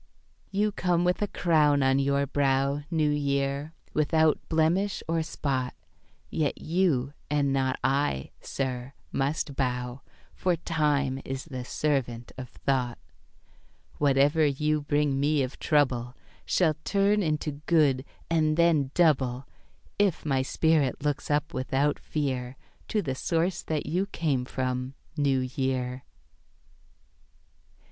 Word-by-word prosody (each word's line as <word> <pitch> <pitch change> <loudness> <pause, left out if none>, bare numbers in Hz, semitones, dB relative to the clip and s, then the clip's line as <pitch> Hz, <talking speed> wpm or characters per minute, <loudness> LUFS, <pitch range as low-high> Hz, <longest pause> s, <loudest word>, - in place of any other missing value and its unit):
You 205 +2 +1
come 175 -3 +1
with 180 +2 +1
a 210 - +1
crown 150 -7 +3
on 135 +1 +3
your 140 0 +2
brow, 140 0 +1
New 155 -3 +2
Year, 140 +1 -1 0.2
without 155 +1 +3
blemish 170 +5 +1
or 165 0 +1
spot; 135 -5 -2 0.6
Yet 150 -3 -1
you, 155 -6 +1 0.2
and 140 -2 +1
not 130 -1 +1
I, 135 - 0
sir, 130 -1 -4 0.2
must 140 +1 -1
bow, 125 -1 -2 0.3
For 180 -2 +1
time 150 -5 0
is 135 0 -5
the 130 -6 -6
servant 125 -4 -1
of 130 -2 -7
thought 125 0 -1 1.0
Whatever 145 +2 +4
you 150 +1 +1
bring 145 -1 +1
me 145 0 +2
of 130 - -6
trouble 125 -5 +1 0.3
Shall 165 -4 +3
turn 205 +1 +2
into 150 -3 -2
good, 145 -6 +3 0.2
and 155 -2 +2
then 165 -5 +3
double, 135 -7 +2 0.5
If 200 -7 +2
my 135 -3 +2
spirit 145 0 +1
looks 145 -2 -1
up 150 0 0
without 135 +3 0
fear 130 -4 -3 0.3
To 210 -2 0
the 135 - -2
Source 165 +6 0
that 155 -2 -2
you 180 +6 0
came 145 -10 -1
from, 130 0 -3 0.2
New 140 -3 +2
Year. 130 -2 -2
145 Hz, 125 wpm, -27 LUFS, 130-160 Hz, 1.0 s, Whatever